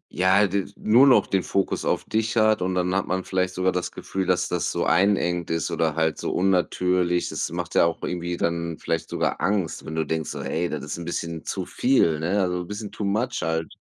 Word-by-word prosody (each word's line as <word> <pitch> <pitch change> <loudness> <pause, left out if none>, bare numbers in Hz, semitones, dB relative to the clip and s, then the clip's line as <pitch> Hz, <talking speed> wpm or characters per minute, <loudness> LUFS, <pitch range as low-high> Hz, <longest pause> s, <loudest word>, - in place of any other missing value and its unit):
ja, 95 +4 +4
d 100 +1 -1
nur 120 +6 +5
noch 130 - +6
den 95 - 0
Fokus 95 +1 -1
auf - - 0
dich 110 +1 -1
hat 110 -2 +4
und 90 0 -1
dann 90 0 0
hat 100 0 0
man 95 0 -1
vielleicht 95 -1 -1
sogar 95 +1 +1
Gefühl, 90 +1 -3
dass 90 -1 +2
das 90 - -1
so - - -1
einengend 90 -1 +2
ist 80 -1 -1
oder 80 -2 0
halt 80 -1 0
so - - -2
unnatürlich. 90 -1 +1
Das - - -3
macht - - -4
ja - - +5
auch 85 - 0
irgendwie 85 0 -3
dann 85 -1 -2
vielleicht 80 0 -3
sogar - - -1
Angst, 100 -4 -1
wenn 80 - -5
du 80 -1 0
denkst 80 +1 -2
so: - - -5
„Hey, 85 +2 -1
das 75 -2 -4
ist 75 +4 -5
'n 85 - -6
bisschen 85 -1 -4
zu 95 -2 -3
viel, 85 - +2
ne, 90 +6 0
also, 90 -1 -1
bisschen 105 +3 -6
too - - -6
much 115 +6 -1
halt.“ 80 0 -2
90 Hz, 220 wpm, -24 LUFS, 85-100 Hz, -, noch